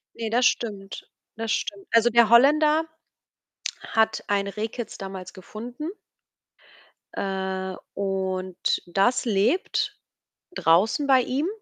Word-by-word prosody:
Ne, 225 -1 -3
das 245 +3 +2
stimmt. 205 -5 -1 0.3
Das 225 0 -3
stimmt. 200 -1 -2
Also, 230 +1 +5
der 235 -1 +5
Holländer 300 +6 +5 1.0
hat 220 0 0
ein 200 -1 +1
Rehkitz 220 +3 -5
damals 190 -1 -7
gefunden 235 - -8 1.3
äh, 190 -1 -3 0.2
und 190 -2 -1
das 195 +9 +1
lebt 225 - +1 0.6
draußen 205 - +3
bei 265 -2 +6
ihm, 270 +7 -1
215 Hz, 105 wpm, -25 LUFS, 195-240 Hz, 1.3 s, bei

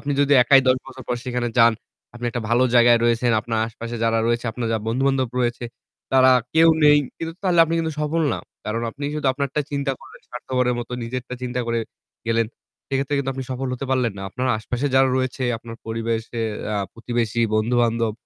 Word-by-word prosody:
আপনি 145 0 -2
যদি 145 0 +3
একাই 135 +2 +6
১০ 130 - +5
বছর 130 0 -10
পর 120 - 0
সেখানে 125 -1 -2
যান, 115 0 +7 0.4
আপনি 120 0 -7
একটা 120 -1 -4
ভালো 120 +2 +3
জায়গায় 120 0 +6
রয়েছেন। 120 +1 +2
আপনার 115 0 -2
আশেপাশে 115 +1 -7
যারা 115 0 +2
রয়েছে, 120 +1 0
আপনার 120 -1 -3
যারা 110 -2 -1
বন্ধু 125 +4 0
বান্ধব 130 -2 +1
রয়েছে, 120 0 -1 0.5
তারা 130 0 +6 0.2
কেউ 165 +1 +6 0.2
নেই। 150 0 +7 0.2
কিন্তু 165 0 -4
তাহলে 180 -3 +1
আপনি 165 +1 -2
কিন্তু 160 -1 -1
সফল 155 +2 0
না। - - -2 0.3
কারণ 115 +2 -2
আপনি 140 +5 -8
শুধু 150 -2 -2
আপনারটা 140 +2 -2
চিন্তা 140 -1 -1
করলেন, - - -15
স্বার্থপরের 125 0 -1
মত 120 - -5
নিজেরটা 125 +2 -5
চিন্তা 125 0 -2
করে 115 0 0 0.5
গেলেন। 115 -1 +2 0.4
সেক্ষেত্রে 135 +1 -1
কিন্তু 135 -1 -1
আপনি 135 - -5
সফল 130 +1 -3
হতে 135 - -5
পারলেন 125 -4 +1
না। - - -6
আপনার 130 +2 -3
আশেপাশে 125 +5 -3
যারা 135 0 +5
রয়েছে, 130 0 -2 0.2
আপনার 115 0 -10
পরিবেশের 115 0 -2 0.2
আ - - 0 0.2
প্রতিবেশী 115 -1 -2
বন্ধু-বান্ধব 115 0 +1
125 Hz, 195 wpm, -22 LUFS, 115-135 Hz, 0.5 s, যান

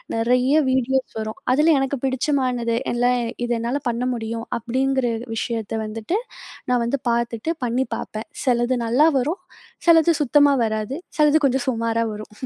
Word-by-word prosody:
நிறைய 250 +4 +2 0.2
வீடியோஸ் 260 -1 0
வரும். 215 0 -6
அதில 310 +4 +4
எனக்கு 270 0 -1
பிடிச்சமானது 255 -3 0 0.2
எல்லாம், 245 +1 +2 0.3
இது 240 - -1
என்னால 245 +5 -2
பண்ண 235 +1 -2
முடியும் 230 0 -4
அப்பிடிங்கிற 260 +1 0 0.2
விஷயத்த 225 -1 -3
வந்துட்டு, 225 - -3 0.5
நான் 245 -1 +2
வந்து 270 +3 -1
பார்த்துட்டு 235 +5 -1
பண்ணி 245 +3 0
பாப்பேன். 215 +8 -6 0.2
சிலது 245 0 +2
நல்லா 265 +8 +4
வரும், 310 +9 -2 0.5
சிலது 335 0 +6
சுத்தமா 285 +1 +4
வராது, 220 +5 -3 0.2
சிலது 300 +1 +5
கொஞ்சம் 260 0 -1
சுமாரா 230 -1 0
வரும். 210 0 -9
245 Hz, 140 wpm, -22 LUFS, 230-270 Hz, 0.5 s, சிலது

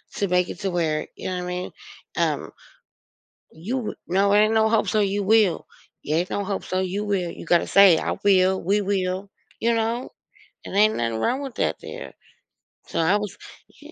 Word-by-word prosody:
to 200 - 0
make 180 0 +1
it - - -7
to 195 -2 -1
where 160 -3 -1
you - - -5
know 185 - -3
I - - -3
mean? 180 0 -4 0.5
Um, - - -1 1.0
you 185 +11 -5
w 240 -4 -4
no, 195 +3 +2
ain't 215 +2 +4
no 220 0 +3
"Hope 220 -1 +2
so." 215 - +1
You 200 0 0
will. 210 -3 +3 0.4
Yeah, 155 +2 0
ain't 180 +2 -1
no 205 - -2
"Hope 195 0 -3
so." 185 - -1
You 190 +3 -2
will, 190 -4 -1
you - - -10
gotta 170 0 +2
say, 195 -4 +7
"I - - -2
will. 190 -1 +4
We 205 +3 +2
will," 190 0 -2 0.3
you 235 +1 +2
know? 230 +2 -1 0.5
And - - -7
ain't 215 +2 +4
nothing 115 -1 -1
wrong 255 - 0
with 270 -4 -7
that - - 0
there. - - -8 0.7
So - - -3
I 180 +6 +3
was 210 -2 -5 0.4
Yeah. 300 - -13
195 Hz, 200 wpm, -23 LUFS, 180-215 Hz, 1.0 s, say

